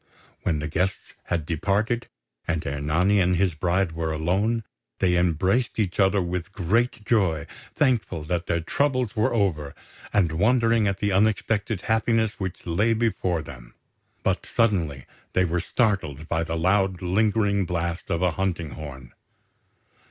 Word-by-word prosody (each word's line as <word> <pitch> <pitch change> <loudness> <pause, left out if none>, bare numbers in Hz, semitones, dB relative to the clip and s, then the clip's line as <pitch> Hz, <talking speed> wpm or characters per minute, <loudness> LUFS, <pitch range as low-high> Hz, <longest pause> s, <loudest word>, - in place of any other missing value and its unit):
When 80 -4 0
the 75 +1 -3
guests 90 +4 -2
had 85 -3 -1
departed, 100 +8 0 0.4
and 80 -1 -1
Ernani 75 +8 +1
and 90 0 +3
his 90 -1 +2
bride 90 +2 0
were 80 0 -2
alone, 95 +9 0 0.3
they 90 -2 +2
embraced 90 +7 +1
each 100 -4 -1
other 95 0 +4
with 90 +1 -4
great 110 +5 0
joy, 90 -11 +2 0.3
thankful 115 - +1
that 85 +2 -2
their 85 - 0
troubles 130 - 0
were 110 - +2
over, 85 -10 0 0.4
and 90 -6 +2
wondering 115 +4 +3
at 100 -1 0
the 100 0 0
unexpected 105 0 +1
happiness 110 -1 +1
which 95 -3 -5
lay 105 +7 +2
before 95 -8 0
them; - - -12 0.5
but 95 -1 0
suddenly 85 - 0 0.3
they 95 - +3
were 90 +1 0
startled 90 - -1
by 80 0 0
the 80 0 -3
loud 95 +1 +1
lingering 100 0 +2
blast 85 0 -3
of 85 +2 0
a 90 - +3
hunting 85 -3 -2
horn. 65 -5 -9
95 Hz, 145 wpm, -25 LUFS, 80-105 Hz, 0.5 s, other